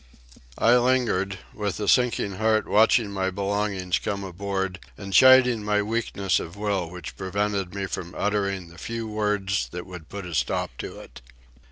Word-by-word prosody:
I 120 +2 +5
lingered, 120 -7 +1 0.2
with 105 -2 -3
a 105 - -2
sinking 115 -6 +2
heart 110 0 +2
watching 110 0 +4
my 95 -1 -1
belongings 100 -1 -1
come 100 -1 -3
aboard 95 0 -3 0.2
and 100 -1 -7
chiding 125 -1 +7
my 105 0 +1
weakness 105 -3 0
of 85 - -7
will 100 -5 -1
which 90 -1 -8
prevented 100 -1 -2
me 100 -1 -2
from 90 -2 -6
uttering 100 -3 -1
the 85 +2 -14
few 115 -1 -4
words 105 -2 -1
that 90 0 -7
would 90 -4 -10
put 100 -2 -6
a 90 - -7
stop 80 - 0
to - - -6
it. - - -13
100 Hz, 165 wpm, -25 LUFS, 95-105 Hz, 0.2 s, chiding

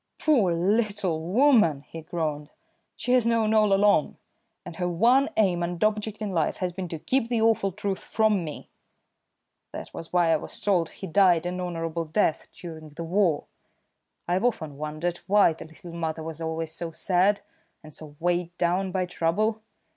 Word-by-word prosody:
"Poor 240 - +3
little 195 -1 0
woman!" 205 - +3
he 165 - -8
groaned. 155 -2 -3 0.5
"She 245 - -3
has 245 -2 +4
known 225 -2 +2
all 215 -2 +4
along, 195 -5 +3 0.5
and 165 - -9
her 180 - -1
one 240 +11 +3
aim 185 -5 +2
and 170 +1 -2
object 215 0 -1
in 205 - -3
life 165 -4 0
has 180 -2 -2
been 185 0 -5
to 165 - -5
keep 255 - 0
the 235 -2 +1
awful 220 -3 +2
truth 195 0 -3
from 215 -4 +1
me. 155 -2 -8 1.0
That - - -8
was 165 - -8
why 175 -2 +3
I - - +3
was - - -8
told 180 -5 +1
he 195 - -9
died 175 -1 +3
an 180 +1 -3
honourable 165 -2 -3
death 160 +1 0
during 160 -3 -10
the 155 +3 -7
war. 175 -2 +1 0.8
I've 180 +4 0
often 160 - -1
wondered 155 +3 -3
why 200 -4 +5
the 160 - -10
little 165 +2 -12
mother 160 -1 -3
was 160 0 -7
always 160 0 -3
so 165 +1 -4
sad, 185 +5 +2 0.4
and 155 -1 -13
so 150 -1 -11
weighed 175 0 -1
down 180 +2 0
by 185 -1 0
trouble. 205 +6 0
175 Hz, 175 wpm, -26 LUFS, 165-210 Hz, 1.0 s, why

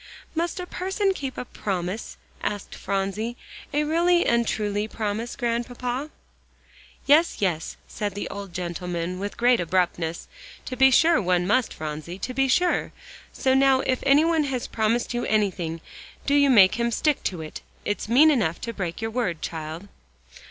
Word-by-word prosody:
"Must 340 +3 -2
a 360 - -4
person 385 +2 -1
keep 270 -7 -5
a - - -4
promise?" 190 -1 -4 0.2
asked 205 -2 -3
Phronsie, 200 +5 -2 0.3
"a 295 0 +1
really 345 +3 +3
and 235 -1 +2
truly 210 0 -1
promise, 220 +1 -3
Grandpapa?" 245 +3 -2 1.0
"Yes, 310 +4 +5
yes," 175 -5 -1
said 205 -2 -4
the 205 - -3
old 200 -2 -7
gentleman 175 0 -4
with 200 +1 -5
great 245 0 +4
abruptness, 175 -1 -1 0.4
"to 255 - -4
be 265 +1 +6
sure 320 +3 +5
one 180 -2 +1
must, 230 +5 +2
Phronsie. 155 +3 -6
To 255 +6 -4
be 270 +1 +2
sure. 355 +8 +2 0.4
So 260 -1 +1
now 265 0 +4
if 255 -1 0
any 280 +3 +5
one 325 -2 +2
has 260 -3 -2
promised 225 +3 0
you 240 0 -1
anything, 185 -6 0 0.4
do 280 - +1
you 285 -1 +5
make 210 -3 +6
him 235 0 +2
stick 290 +5 +1
to 180 -4 -2
it. 155 - -8 0.2
It's 205 +1 -2
mean 295 +7 +7
enough 210 - +1
to 230 - -4
break 185 0 -4
your 225 - -2
word, 195 -9 -2
child." 160 +3 -5
230 Hz, 165 wpm, -25 LUFS, 185-270 Hz, 1.0 s, mean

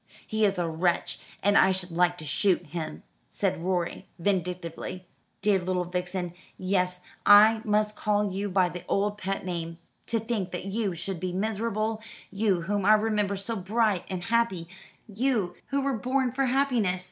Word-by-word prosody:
"He 220 0 +1
is 195 -2 +1
a 175 -1 0
wretch, 170 +2 0 0.2
and 205 +1 +4
I 190 - +6
should 185 -1 -3
like 175 +1 +2
to 155 - -6
shoot 180 +4 +2
him," 155 0 -6 0.3
said 190 -4 -1
Rorie 180 -2 -1
vindictively. 180 -1 -2 0.4
"Dear 205 -2 +4
little 180 0 -1
Vixen 180 0 -3 0.2
yes, 180 -1 0 0.2
I 215 +2 +7
must 210 0 +2
call 205 -1 +1
you 200 +2 -2
by 185 -1 +3
the 175 0 -7
old 205 +1 0
pet 195 0 -3
name 170 -2 -4 0.3
to 230 - +1
think 220 -4 -2
that 180 - -4
you 195 -2 -1
should 175 +1 -3
be 180 0 -3
miserable, 215 +2 -1 0.3
you 195 -3 +1
whom 200 +3 -1
I 210 +3 +6
remember 210 -2 +1
so 200 +4 -3
bright 210 0 +1
and 185 -2 -4
happy, 225 -6 +1 0.4
you 215 -4 0
who 280 0 0
were 270 -4 -1
born 255 +1 +1
for 270 +2 0
happiness! 245 -8 +1
195 Hz, 170 wpm, -27 LUFS, 180-215 Hz, 0.4 s, I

